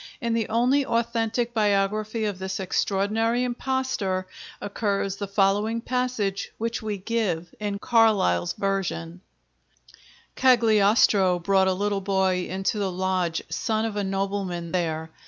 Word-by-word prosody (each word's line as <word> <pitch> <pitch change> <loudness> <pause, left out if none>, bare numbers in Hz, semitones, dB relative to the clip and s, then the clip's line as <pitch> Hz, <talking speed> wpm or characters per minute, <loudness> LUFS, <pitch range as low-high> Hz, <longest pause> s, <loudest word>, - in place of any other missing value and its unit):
In 235 -4 -1
the 225 -2 -1
only 250 +5 +3
authentic 235 0 -1
biography 215 +1 +1
of 205 -3 -3
this 190 +1 -4
extraordinary 210 +5 0
impostor 245 -7 -1 0.3
occurs 200 -1 -2
the 200 - -4
following 205 +3 +1
passage, 235 -6 -2
which 230 +2 -2
we 215 -2 -3
give 190 -5 -2
in 205 -1 -2
Carlyle's 200 - +2
version: 185 -3 -3 1.1
Cagliostro 215 -6 +4
brought 190 +2 +2
a 190 - +3
little 200 +1 -1
Boy 190 -2 +1
into 190 +3 -1
the 195 -2 -1
Lodge, 185 -2 -1
son 220 -2 -1
of 220 -2 -3
a 205 - -1
nobleman 195 -3 -2
there. 160 -3 -2
200 Hz, 125 wpm, -25 LUFS, 190-225 Hz, 1.1 s, Cagliostro